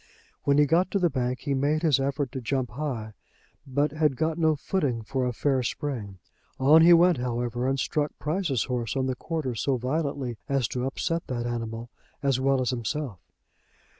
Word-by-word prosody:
When 140 0 +4
he 150 - +6
got 170 +6 +2
to - - 0
the 175 -4 +2
bank 125 -1 -1
he 145 - -1
made 145 +4 +1
his 150 -4 +4
effort 140 -1 -1
to 130 - -5
jump 125 -1 -1
high, 120 -5 -4 0.5
but 145 +3 +1
had 155 -2 +1
got 160 +3 -1
no 160 -1 +3
footing 140 -7 -1
for 125 +5 -1
a - - 0
fair 135 +2 +1
spring. 115 -6 -4 0.4
On 150 +5 +7
he 170 +2 +7
went, 175 -1 +6
however, 120 0 -2
and 135 0 0
struck 150 +2 0
Price's 155 - 0
horse 125 -2 -2
on 130 -1 +1
the 130 -1 -1
quarter 155 -2 -3
so 130 +4 0
violently 135 -2 -2
as 135 -4 +1
to 125 +1 -2
upset 165 +5 -2
that 120 -2 -3
animal, 115 -1 -4 0.3
as 135 -2 +2
well 135 0 +2
as 125 - 0
himself. 125 - -3
135 Hz, 190 wpm, -27 LUFS, 125-150 Hz, 0.5 s, On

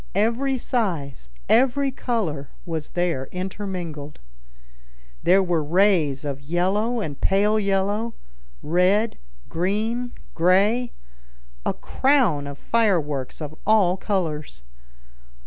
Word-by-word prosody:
Every 235 +6 +1
size, 165 - -2 0.2
every 265 +3 +3
color, 185 - -2 0.2
was 160 -3 -4
there 170 -7 0
intermingled. 180 -6 -5 1.0
There 190 +2 +5
were 175 -4 0
rays 160 -4 +2
of 140 -1 -4
yellow 190 +10 0
and 145 -8 -5
pale 210 +3 +3
yellow, 205 +3 0 0.5
red, 185 +7 +2 0.3
green, 220 +8 -1 0.2
gray—a 60 - -1
crown 235 - +2
of 140 0 -7
fireworks 160 - 0
of 150 0 -5
all 205 -5 +4
colors. 160 - -3
185 Hz, 95 wpm, -23 LUFS, 150-215 Hz, 1.0 s, There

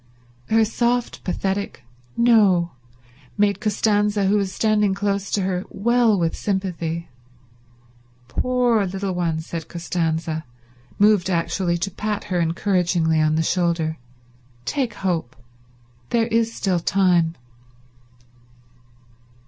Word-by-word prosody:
Her 225 0 +4
soft, 240 +2 -1
pathetic 195 +2 -3 0.3
"No" 205 -8 +4 0.7
made 205 -1 +2
Costanza, 210 -1 +1
who 195 +2 +3
was 195 -2 -1
standing 210 -2 +2
close 200 -1 -1
to 200 - 0
her, 185 -1 -1
well 235 +1 +2
with 165 -2 0
sympathy. 170 -4 -3 1.2
"Poor 245 - +1
little 190 +1 -3
one," 165 -3 -1
said 165 0 -6
Costanza, 165 -2 -2 0.5
moved 205 -3 +4
actually 175 0 0
to 185 +3 -3
pat 210 +2 -3
her 175 - +2
encouragingly 170 -2 +1
on 155 0 +2
the 160 - +1
shoulder, 165 -2 0 0.7
"take 250 - -1
hope. 170 -11 -2 0.7
There 230 -1 +2
is 230 0 +1
still 190 -5 0
time." 175 -2 +2
190 Hz, 110 wpm, -22 LUFS, 170-210 Hz, 1.2 s, Her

